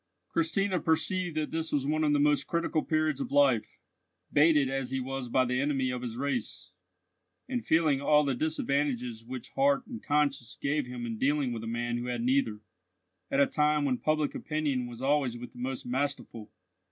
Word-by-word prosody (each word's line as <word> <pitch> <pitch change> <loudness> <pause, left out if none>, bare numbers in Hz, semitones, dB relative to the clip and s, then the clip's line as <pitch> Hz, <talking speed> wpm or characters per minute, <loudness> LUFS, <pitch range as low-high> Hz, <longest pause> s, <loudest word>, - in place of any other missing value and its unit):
Christina 185 +3 +1
perceived 160 +1 0
that 155 -1 -1
this 160 0 -2
was 140 -2 0
one 155 +2 +1
of 150 - +3
his 145 - +3
most 145 0 +3
critical 170 -2 0
periods 155 -3 0
of - - -4
life, 140 -6 +3 0.6
baited 150 -2 +5
as 135 -1 -2
he 135 - -1
was 130 -1 -4
by 130 +2 +3
the 125 +1 0
enemy 135 -3 0
of 125 -1 -4
his 120 -2 -5
race, 130 -8 -3 0.8
and 250 -2 -2
feeling 155 -4 +2
all 150 +1 +4
the 140 -2 0
disadvantages 135 -5 -1
which 125 +1 -7
heart 275 -1 +2
and 240 -3 -8
conscience 140 -5 0
gave 145 -1 0
him 125 -1 -5
in 115 -2 -5
dealing 140 -2 +1
with 115 -1 -5
a - - -5
man 120 +1 -2
who 120 - -4
had 120 -1 -2
neither, 125 -5 +1 0.7
at 135 - +1
a 140 - +7
time 150 0 +2
when 130 -3 0
public 155 -1 0
opinion 145 -5 -2
was 120 +1 -9
always 135 -4 +1
with 125 +1 -9
the 125 - -14
most 130 +1 -4
masterful. 125 -4 -3
140 Hz, 190 wpm, -29 LUFS, 125-155 Hz, 0.8 s, a